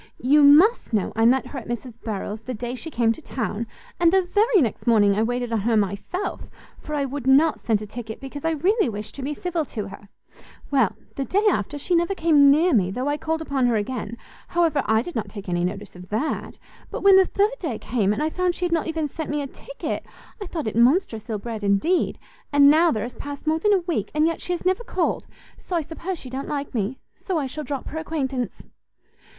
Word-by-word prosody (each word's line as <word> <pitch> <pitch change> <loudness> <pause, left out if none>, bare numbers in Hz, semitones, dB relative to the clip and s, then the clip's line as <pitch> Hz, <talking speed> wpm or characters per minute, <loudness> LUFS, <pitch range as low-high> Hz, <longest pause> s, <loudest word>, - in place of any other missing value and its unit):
You 290 +4 +5
must 310 - +6
know 210 -3 0
I 225 +1 +3
met 260 +2 +3
her 275 - -6
at 235 - -12
Mrs 240 0 -6
Harrel's 210 0 -4
the 250 +2 -5
day 240 +2 -4
she 260 +6 -6
came 235 -6 +2
to 230 - -5
town, 230 -5 -3 0.3
and 340 -1 +5
the 380 0 +4
very 420 +4 +3
next 245 -4 -1
morning 210 -4 +5
I 210 - +1
waited 245 +1 -1
on 225 - +2
her 225 +2 +1
myself, 205 - -2 0.3
for 300 - -5
I 285 -1 0
would 270 -1 -5
not 295 +4 +5
send 215 -2 0
a - - -5
ticket, 220 +1 -7
because 275 +1 -8
I 325 - +2
really 355 - +2
wished 210 -1 -6
to 280 - -7
be 290 +3 -3
civil 350 -1 -2
to 210 -7 -5
her; 200 0 -12 0.6
well, 265 -9 +3 0.2
the 275 - 0
day 405 +8 +1
after, 290 - 0
she 320 +5 -2
never 345 +3 +2
came 305 -5 +5
near 320 +5 +4
me, 190 -6 +3
though 250 +8 -3
I 290 - +1
called 320 +1 -2
upon 270 -5 +1
her 240 - +2
again; 220 +1 -3 0.3
however, 330 -4 +2
I 220 +1 +3
did 350 - -7
not 225 - -2
take 200 -2 -9
any 175 -1 0
notice 195 +2 -4
of 180 0 -12
that; 230 +9 -2 0.3
but - - -5
when 395 -1 +8
the 380 - +6
third 420 +5 +1
day 285 - -3
came, 215 -4 0
and 210 +8 -1
I 310 - 0
found 365 0 0
she 360 - -2
had 350 - -2
not 330 -1 +1
even 320 -2 -1
sent 315 +3 -6
me 295 0 -1
a - - -3
ticket, - - -6 0.4
I 400 - -4
thought 325 -4 -4
it 215 - -3
monstrous 235 - +2
ill 220 - -1
bred 220 0 -6
indeed; 200 - +2 0.3
and 285 -1 +7
now 330 +3 +5
there 215 -8 -1
has 245 +1 -6
passed 285 +1 -7
more 315 +1 +1
than 420 +4 +2
a 390 -3 +4
week, 340 - -2
and 305 +1 +3
yet 330 0 -1
she 360 - -2
has 350 - -5
never 370 +5 +1
called: 365 -7 -1 0.3
so 360 - -5
I 335 - +2
suppose 335 +4 -5
she 255 -5 -9
don't 265 +1 -4
like 285 -1 -4
me; 230 +2 -2 0.2
so 370 -4 -3
I 295 - 0
shall 300 +4 -5
drop 280 -1 -4
her 315 - -4
acquaintance." 270 -6 -3
275 Hz, 240 wpm, -24 LUFS, 225-325 Hz, 0.6 s, when